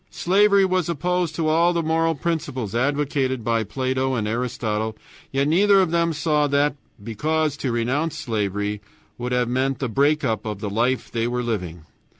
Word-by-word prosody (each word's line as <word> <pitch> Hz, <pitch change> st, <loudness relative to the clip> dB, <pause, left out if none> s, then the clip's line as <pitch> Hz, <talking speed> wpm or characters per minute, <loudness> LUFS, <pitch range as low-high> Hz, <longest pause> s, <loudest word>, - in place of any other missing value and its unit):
Slavery 200 Hz, +2 st, +3 dB
was 185 Hz, -3 st, 0 dB
opposed 175 Hz, 0 st, -1 dB
to 160 Hz, -1 st, -1 dB
all 165 Hz, +3 st, +3 dB
the 170 Hz, -1 st, 0 dB
moral 165 Hz, +1 st, +1 dB
principles 145 Hz, -, -3 dB
advocated 135 Hz, -1 st, 0 dB
by 115 Hz, 0 st, +1 dB
Plato 130 Hz, +3 st, -1 dB
and 110 Hz, -3 st, -1 dB
Aristotle, 110 Hz, -2 st, -2 dB, 0.3 s
yet 135 Hz, +1 st, +1 dB
neither 195 Hz, +5 st, +5 dB
of 185 Hz, -4 st, +2 dB
them 170 Hz, 0 st, +2 dB
saw 150 Hz, -1 st, +1 dB
that, 145 Hz, 0 st, +2 dB, 0.3 s
because 150 Hz, +7 st, -1 dB
to 130 Hz, -, -2 dB
renounce 130 Hz, +7 st, -1 dB
slavery 105 Hz, -2 st, -2 dB, 0.4 s
would 125 Hz, +1 st, -3 dB
have 125 Hz, -1 st, +1 dB
meant 130 Hz, +2 st, 0 dB
the 135 Hz, -, -2 dB
break 145 Hz, +6 st, +2 dB
up 110 Hz, -5 st, -1 dB
of 105 Hz, -2 st, -5 dB
the 105 Hz, -1 st, -4 dB
life 120 Hz, +5 st, 0 dB
they 115 Hz, 0 st, -1 dB
were 125 Hz, 0 st, -2 dB
living. 90 Hz, -8 st, -4 dB
135 Hz, 170 wpm, -23 LUFS, 115-160 Hz, 0.4 s, neither